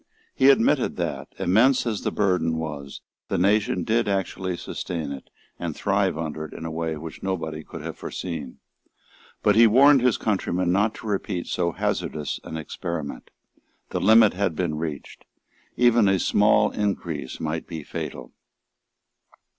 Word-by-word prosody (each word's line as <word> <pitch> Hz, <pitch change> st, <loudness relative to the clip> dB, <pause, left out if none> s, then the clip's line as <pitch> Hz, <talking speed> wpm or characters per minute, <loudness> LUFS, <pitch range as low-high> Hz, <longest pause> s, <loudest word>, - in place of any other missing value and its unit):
He 135 Hz, +1 st, +5 dB
admitted 135 Hz, -4 st, +3 dB
that, -, -, -3 dB
immense 125 Hz, +9 st, +3 dB
as 110 Hz, -4 st, -2 dB
the -, -, -1 dB
burden 90 Hz, -5 st, +1 dB
was, 75 Hz, -4 st, -6 dB, 0.3 s
the -, -, -1 dB
nation 100 Hz, -1 st, +2 dB
did 115 Hz, +3 st, +1 dB
actually 95 Hz, -2 st, -2 dB
sustain 80 Hz, -5 st, -5 dB
it 70 Hz, -, -8 dB, 0.3 s
and -, -, -4 dB
thrive -, -, +1 dB
under 80 Hz, -1 st, -4 dB
it -, -, -11 dB
in 80 Hz, -, -7 dB
a 80 Hz, -, -4 dB
way 80 Hz, -1 st, -3 dB
which 80 Hz, +1 st, -9 dB
nobody 80 Hz, -5 st, -3 dB
could -, -, -9 dB
have -, -, -7 dB
foreseen. 80 Hz, -7 st, -6 dB, 0.9 s
But 105 Hz, -, +4 dB
he 115 Hz, +1 st, +8 dB
warned 135 Hz, +4 st, +6 dB
his 125 Hz, -2 st, +3 dB
countrymen 90 Hz, -4 st, 0 dB
not 105 Hz, +4 st, +2 dB
to -, -, -11 dB
repeat 100 Hz, -3 st, -2 dB
so 85 Hz, -1 st, -1 dB
hazardous 75 Hz, -2 st, -2 dB
an 80 Hz, -, -6 dB
experiment. 80 Hz, -1 st, -5 dB, 0.6 s
The -, -, -2 dB
limit 110 Hz, +1 st, +6 dB
had 95 Hz, -3 st, -1 dB
been 85 Hz, -2 st, -1 dB
reached. 80 Hz, -3 st, -6 dB, 0.5 s
Even 120 Hz, -3 st, +5 dB
a 95 Hz, 0 st, +3 dB
small 105 Hz, +4 st, +3 dB
increase 85 Hz, -9 st, -3 dB
might 80 Hz, 0 st, -3 dB
be 80 Hz, -3 st, -6 dB
fatal. -, -, -6 dB
90 Hz, 155 wpm, -24 LUFS, 80-105 Hz, 0.9 s, he